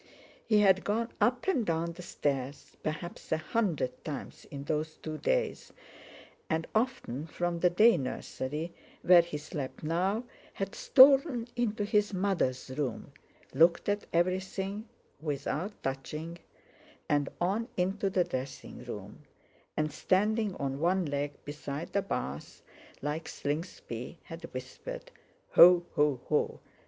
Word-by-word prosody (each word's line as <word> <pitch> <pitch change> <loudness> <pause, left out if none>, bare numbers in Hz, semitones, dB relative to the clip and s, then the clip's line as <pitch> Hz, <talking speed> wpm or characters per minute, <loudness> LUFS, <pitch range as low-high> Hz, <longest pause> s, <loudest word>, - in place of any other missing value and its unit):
He 215 -2 +5
had 190 -1 +5
gone 230 +3 0
up 250 +5 +2
and 320 -11 +3
down 170 -2 0
the 180 - -9
stairs 140 -5 -3
perhaps 160 +3 -5
a 160 - +3
hundred 155 - -1
times 150 -3 -6
in 140 -1 -6
those 155 +1 -2
two 155 -1 -6
days, - - 0 0.8
and 160 0 0
often 215 - -1
from 175 +1 -2
the 180 - +5
day 215 +5 +6
nursery, 150 +4 -4 0.3
where 180 -1 +8
he 170 -3 -5
slept 145 -2 -6
now, 185 +8 +1 0.3
had 195 0 -3
stolen 270 -2 +6
into 220 -3 0
his 210 -1 +2
mother's 175 -10 0
room, 140 0 -3 0.4
looked 165 +5 +4
at 205 0 0
everything, 190 +4 -1 0.3
without 155 +6 -3
touching, 150 +5 -4 0.7
and 145 -1 +2
on 200 +6 0
into 195 +2 +1
the 185 -1 +3
dressing 130 -3 -6
room; - - -8 0.6
and 155 0 0
standing 210 +1 +1
on 135 0 -3
one 180 +3 +2
leg 145 0 -2
beside 145 +1 -5
the 200 - +3
bath, 70 - -4 0.4
like 150 +3 -2
Slingsby, 145 -3 -4
had 165 0 -8
whispered: - - -7 0.4
"Ho, 175 0 +8
ho, 145 -3 +2
ho! 150 - +1
170 Hz, 130 wpm, -31 LUFS, 150-205 Hz, 0.8 s, where